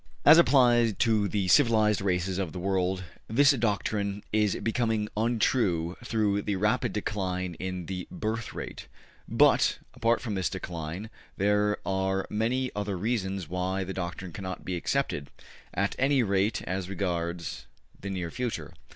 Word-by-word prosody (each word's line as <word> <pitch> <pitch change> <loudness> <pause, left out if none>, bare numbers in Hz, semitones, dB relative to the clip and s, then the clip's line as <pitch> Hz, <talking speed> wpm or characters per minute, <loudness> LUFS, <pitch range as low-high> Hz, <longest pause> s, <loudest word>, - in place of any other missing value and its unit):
As 155 +3 +9
applied 120 - +5
to 110 -3 +3
the 100 -2 -1
civilized 110 -3 +4
races 95 0 0
of 90 -5 -3
the - - -5
world, 95 0 0 0.2
this 140 +6 +5
doctrine 105 -4 -1
is 105 -2 +2
becoming 110 -2 0
untrue 105 -6 +1
through 105 -4 +1
the 100 0 -1
rapid 110 +4 +1
decline 95 -4 -2
in 90 -1 -4
the 90 0 -5
birth 110 +1 -3
rate; - - -7 0.4
but, - - +4 0.2
apart 115 0 +2
from 115 -5 -4
this 95 -3 0
decline, 85 +6 -6 0.3
there 105 +1 +2
are 95 0 0
many 120 +4 0
other 100 -2 -2
reasons 95 -4 -2
why 90 +2 -1
the 95 +1 -5
doctrine 90 0 -5
cannot 95 -2 -6
be 90 - -2
accepted, 85 - -1 0.4
at - - -1
any 135 -1 +3
rate 100 +1 +1
as 95 0 -3
regards 85 -3 -3 0.3
the 100 - -6
near 90 -3 -3
future. 125 -2 -4
100 Hz, 145 wpm, -28 LUFS, 95-110 Hz, 0.4 s, As